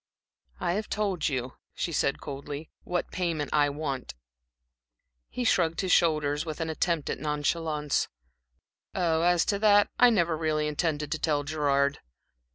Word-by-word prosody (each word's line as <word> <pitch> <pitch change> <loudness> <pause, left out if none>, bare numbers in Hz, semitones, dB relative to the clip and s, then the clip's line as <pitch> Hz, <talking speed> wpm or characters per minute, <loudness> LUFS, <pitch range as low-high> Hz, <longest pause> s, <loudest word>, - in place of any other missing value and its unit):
"I 175 - 0
have 215 +3 -3
told 200 -7 0
you," 130 -2 -3 0.2
she 170 - -2
said, 140 -2 0
coldly, 145 +2 -7
"what 180 0 -2
payment 165 -5 -2
I 145 -1 +4
want." 140 - -4 1.1
He 250 - -3
shrugged 165 -8 +2
his 190 -2 -1
shoulders, 150 -3 +3
with 155 -1 -6
an 160 -1 -2
attempt 160 -1 0
at - - -4
nonchalance. 150 0 -1 0.9
"Oh, 165 -3 +1
as 175 0 +3
to 200 - 0
that, 205 -1 +5
I 245 - +8
never 170 -7 +2
really 155 -1 0
intended 150 -1 -1
to 160 - -1
tell 150 -2 +1
Gerard." 140 -2 +1
155 Hz, 150 wpm, -28 LUFS, 145-175 Hz, 1.1 s, I